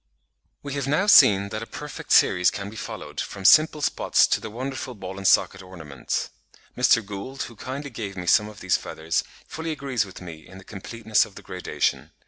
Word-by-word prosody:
We 140 -1 -5
have 140 -2 -3
now 155 +8 +1
seen 100 - +6
that - - -5
a - - -7
perfect - - -8
series 90 0 +5
can 100 0 -6
be - - -12
followed, - - -6
from 100 -1 -8
simple 155 +2 +6
spots - - +3
to - - 0
the 110 - -6
wonderful 130 +2 -6
ball 95 -1 -8
and 95 - 0
socket - - +3
ornaments. 80 -8 -5 0.4
Mr. 125 -3 +3
Gould, 105 +7 -6
who 115 - -10
kindly 140 +5 -6
gave 100 -4 -6
me 90 - -5
some 105 +4 +3
of 105 - -13
these 95 - +2
feathers, 80 +1 -3 0.2
fully 160 +1 -6
agrees 140 -7 -1
with 95 -2 -11
me 85 -3 -11
in 95 - -13
the 95 - -13
completeness 110 +2 -1
of 100 - -11
the - - -11
gradation. 90 -1 -2
105 Hz, 200 wpm, -24 LUFS, 95-130 Hz, 0.4 s, seen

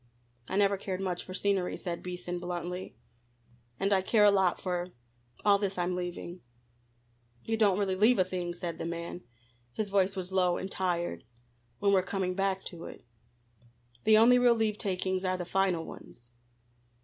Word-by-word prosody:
"I - - -3
never 200 -1 +3
cared 190 -1 -4
much 185 -2 -2
for 185 - -8
scenery," 195 -2 0
said 170 -2 -4
Beason 180 0 -5
bluntly, 180 +1 -5 0.8
"and 200 +1 +2
I 190 - +3
care 210 +2 +4
a 205 - +7
lot 190 -3 +2
for 180 -1 -3 0.5
all 200 -1 +5
this 195 -2 -2
I'm 180 0 0
leaving." 180 0 -5 1.1
"We 225 - +1
don't 205 -4 +3
really 200 -2 +1
leave 220 +6 +4
a 185 - +5
thing," 180 -1 -4
said 175 -1 -5
the - - -3
man 170 +1 -5 0.5
his 205 - -3
voice 195 0 +2
was 185 -1 -5
low 180 -2 +2
and 190 - -5
tired 175 - -1 0.5
"when 200 -1 +2
we're 190 - +5
coming 185 0 -2
back 195 0 0
to 170 -2 -7
it. - - -11 1.0
The 215 0 +6
only 245 +3 +7
real 245 -1 +5
leave 220 -2 0
takings 185 -1 -1
are 185 0 0
the 180 - -4
final 180 -2 +1
ones." 120 -5 -12
185 Hz, 175 wpm, -30 LUFS, 180-200 Hz, 1.1 s, a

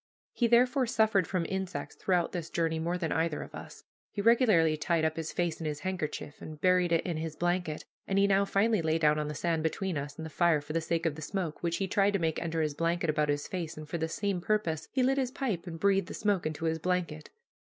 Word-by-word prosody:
He, 240 - +2
therefore, 245 +2 +4
suffered 220 -6 +2
from 180 -3 -1
insects 190 -1 -4
throughout 180 -3 +1
this 170 -3 -4
journey 165 -1 0
more 170 +2 -1
than 165 -3 -2
either 160 -2 0
of - - -13
us. - - -10 0.3
He - - -6
regularly 210 -8 +4
tied 160 +1 +1
up 160 0 0
his 160 -1 -4
face 175 -2 -1
in 160 - -3
his 150 -1 -4
handkerchief, 155 -5 -4
and 155 -1 -8
buried 180 +1 +3
it 165 - +2
in 170 -3 -2
his 160 -1 -4
blanket, 175 -3 -1 0.2
and 195 - 0
he 200 - +5
now 200 0 +4
finally 205 +1 +2
lay 160 0 +1
down 150 -1 +3
on 150 - -2
the 150 - -5
sand 165 +1 0
between 165 +1 -1
us 145 +1 -7
and 160 - -6
the 160 - -7
fire 170 -1 +3
for 145 +1 -7
the 165 - +1
sake 165 +1 -1
of 165 - +1
the 155 - -9
smoke, 175 -1 -3
which 170 -1 0
he 195 - -1
tried 200 +2 +2
to - - +3
make 160 -3 -1
enter 165 -1 -1
his 150 -1 -1
blanket 165 +1 0
about 150 -1 0
his 145 0 -1
face, 170 -4 -4
and 155 0 -8
for 170 - -3
the 160 0 -1
same 195 0 -1
purpose 170 -6 -1
he 260 - +1
lit 270 +2 +2
his 260 -2 0
pipe 230 - -3
and 165 -1 -6
breathed 195 -1 +2
the - - -6
smoke 205 -6 +1
into 155 +1 -4
his 160 0 0
blanket. 170 -3 -2
170 Hz, 255 wpm, -30 LUFS, 160-195 Hz, 0.3 s, he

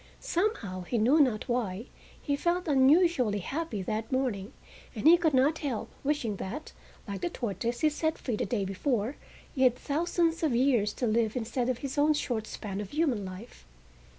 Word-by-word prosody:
Somehow, 335 - -1
he 205 +7 -2
knew 250 +8 +4
not 250 -6 +2
why, 230 -4 -2 0.3
he 285 - -1
felt 345 +4 0
unusually 275 - +4
happy 240 - -3
that 220 +4 -3
morning; 245 -6 -1 0.4
and 220 - -5
he 335 - +10
could 325 -5 +1
not 285 +5 +3
help 265 -8 -3
wishing 270 -8 -1
that, 255 +13 -6 0.4
like 200 -1 -5
the 350 - -1
tortoise 235 - -3
he 310 - +5
set 315 +1 -1
free 245 - -3
the - - -2
day 210 -6 -1
before, 220 +5 -1 0.4
he 265 - -3
had 250 -2 +5
thousands 330 +4 0
of 300 -7 +1
years 240 -5 +3
to 250 - -2
live 225 0 +1
instead 245 +1 -1
of 255 - 0
his 275 +2 -4
own 300 +1 +4
short 225 -6 -2
span 200 -1 -5
of 200 - -7
human 285 -9 0
life. 185 - -10
250 Hz, 180 wpm, -29 LUFS, 215-300 Hz, 0.4 s, he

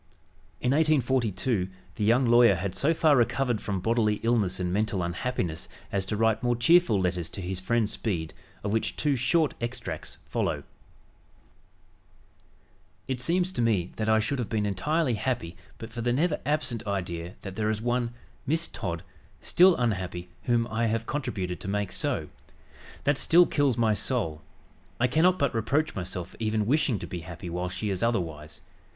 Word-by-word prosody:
In 125 - +1
1842 130 - +1 0.2
the 105 - -3
young 120 +5 +4
lawyer 120 -3 +6
had 90 +1 -3
so 140 +11 +2
far 160 -2 +4
recovered 120 -1 +1
from 100 -2 -2
bodily 110 +1 +2
illness 110 -6 +1
and 90 -1 -1
mental 100 -2 0
unhappiness 85 -2 -3 0.2
as 95 -1 -1
to 105 - -2
write 110 0 +2
more 120 -1 +1
cheerful 120 - +4
letters 90 -2 -1
to 100 - -6
his 95 0 -3
friend 110 +3 +1
Speed 90 -8 -2 0.3
of 100 0 -1
which 110 - 0
two 145 -2 +1
short 150 +5 +2
extracts 120 +1 -5
follow: - - -1 2.4
"It 130 -2 -2
seems 180 +6 +1
to 155 - -2
me 100 -7 +1
that 110 0 -1
I 110 0 +5
should 125 +5 -1
have 120 - -3
been 105 -2 0
entirely 135 - 0
happy 105 -7 -2 0.2
but 115 0 -8
for 120 - -4
the 120 +1 +1
never 150 +4 +1
absent 120 -7 -1
idea 85 -3 -3
that 95 -2 -6
there 110 0 0
is 110 -1 0
one 120 +1 0 0.4
(Miss 165 +4 +1
Todd) 85 -6 -4 0.4
still 180 0 +5
unhappy 95 -7 -2 0.2
whom 120 -2 +2
I 115 +1 +1
have 115 +1 -1
contributed 95 -12 -3
to - - -7
make 100 -1 -1
so. - - -1 0.8
That 145 0 +2
still 175 +2 +6
kills 140 -7 +1
my 115 -2 +3
soul. 100 -7 -1 0.6
I 125 - +4
cannot 160 +9 +3
but 140 -5 +1
reproach 145 +7 0
myself 90 -1 -5
for - - -16
even 110 -1 0
wishing 135 -1 +2
to - - -6
be 90 - -5
happy 85 +1 -8
while 90 +1 -2
she 100 +3 -3
is 95 - -2
otherwise. 80 -9 -2
110 Hz, 170 wpm, -27 LUFS, 95-125 Hz, 2.4 s, lawyer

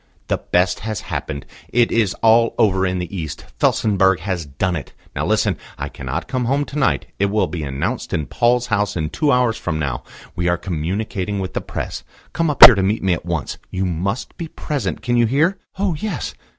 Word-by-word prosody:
"The - - +1
best 90 +1 +1
has 110 +1 -4
happened. 75 -7 -5 0.2
It 120 -1 +2
is 110 -5 +2
all 115 +1 +5
over 95 -4 +3
in 90 0 -1
the 90 +2 -5
East. 80 -4 -5
Felsenburgh 95 -3 +3
has 90 -4 -3
done 85 +7 -1
it. 75 - -6 0.2
Now - - -1
listen. - - +2 0.2
I - - -4
cannot 70 +6 -5
come 130 -2 -1
home 140 +4 +1
to 150 - -5
night. 135 - +1
It 100 - +3
will 105 +2 +1
be 85 - -5
announced 70 -1 -3
in 75 - -1
Paul's 120 +5 +2
House 105 0 +1
in 80 -2 -2
two 150 -2 +1
hours 125 -3 +2
from 80 -3 -2
now. 70 -5 -2 0.3
We 85 0 -1
are 85 0 +2
communicating 95 +4 -3
with 95 -1 -4
the - - -2
Press. - - -5 0.3
Come 165 -1 +1
up 145 - +6
here 125 - +11
to 100 - 0
me 95 -1 +1
at 85 0 -5
once. 85 -5 -3
You 95 +1 -2
must 95 +6 -2
be 165 - -5
present.... 140 -9 -4
Can 120 0 +1
you 120 -1 +4
hear?" 160 - +2 0.2
"Oh, 195 -2 +1
yes." 205 +8 -4
100 Hz, 205 wpm, -20 LUFS, 85-120 Hz, 0.3 s, here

